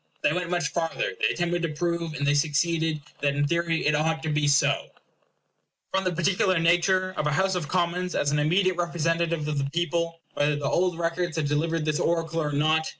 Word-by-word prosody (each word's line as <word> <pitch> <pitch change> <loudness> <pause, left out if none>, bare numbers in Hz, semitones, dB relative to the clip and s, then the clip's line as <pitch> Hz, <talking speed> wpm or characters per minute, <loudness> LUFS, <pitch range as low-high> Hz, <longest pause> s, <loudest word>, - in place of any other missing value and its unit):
They 150 - +3
went 180 0 -2
much 175 -3 0
farther; 165 -1 -2
they - - +4
attempted 175 0 -1
to 165 - -1
prove, 170 +1 -2
and 140 - -2
they 145 - +3
succeeded, 160 +1 +1 0.2
that 140 -1 0
in 145 0 +1
theory 170 0 0
it 150 - +3
ought 160 +2 0
to 160 - -2
be 150 -1 +1
so, 145 0 +2 1.1
from 190 0 +1
the 185 - +1
particular 185 +2 +1
nature 175 +3 +2
of 150 - 0
a - - +1
House 190 +5 +1
of 175 -5 -2
Commons 180 +1 -1
as 145 - +1
an 150 - +1
immediate 180 +4 +2
representative 170 -2 0
of 150 -2 -1
the 140 0 -1
people, 170 +1 -1
whether 145 +1 +1
the 145 -1 -4
old 180 +3 +1
records 170 0 -2
had 160 -2 0
delivered 160 +2 0
this 155 -1 0
oracle 165 -1 0
or 150 -1 -2
not. 155 +2 +1
165 Hz, 210 wpm, -26 LUFS, 150-175 Hz, 1.1 s, they